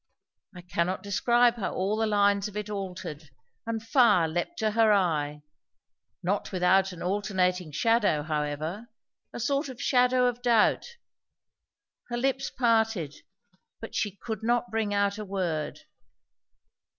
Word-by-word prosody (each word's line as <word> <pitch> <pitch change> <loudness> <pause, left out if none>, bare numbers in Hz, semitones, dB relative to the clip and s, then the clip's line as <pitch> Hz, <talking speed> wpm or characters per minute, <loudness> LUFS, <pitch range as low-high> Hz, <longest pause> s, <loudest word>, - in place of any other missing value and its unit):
I 180 - -9
cannot 175 +1 -2
describe 240 +4 +3
how 210 - -3
all 195 +3 0
the 220 0 0
lines 205 -1 +2
of 210 0 -8
it 210 0 -4
altered; 180 -6 -6 0.4
and 225 -1 -3
fire 225 - +4
leapt 175 - -3
to 220 -2 0
her 220 0 +4
eye, 150 -7 0 0.8
not 195 +3 -1
without 190 +1 +3
an 175 - -8
alternating 180 -3 0
shadow 205 -3 +2
however, 155 +7 -3 0.4
a - - -7
sort 275 +4 0
of 255 -2 -9
shadow 250 0 +3
of 245 0 -1
doubt; 245 - +2 1.1
her 240 - -2
lips 270 +2 0
parted, 225 - +1 0.7
but 225 - -9
she 205 -2 -2
could 220 -1 -5
not 240 +1 0
bring 220 -2 -1
out 200 0 0
a - - -4
word. 180 -6 -3
205 Hz, 140 wpm, -27 LUFS, 180-230 Hz, 1.1 s, fire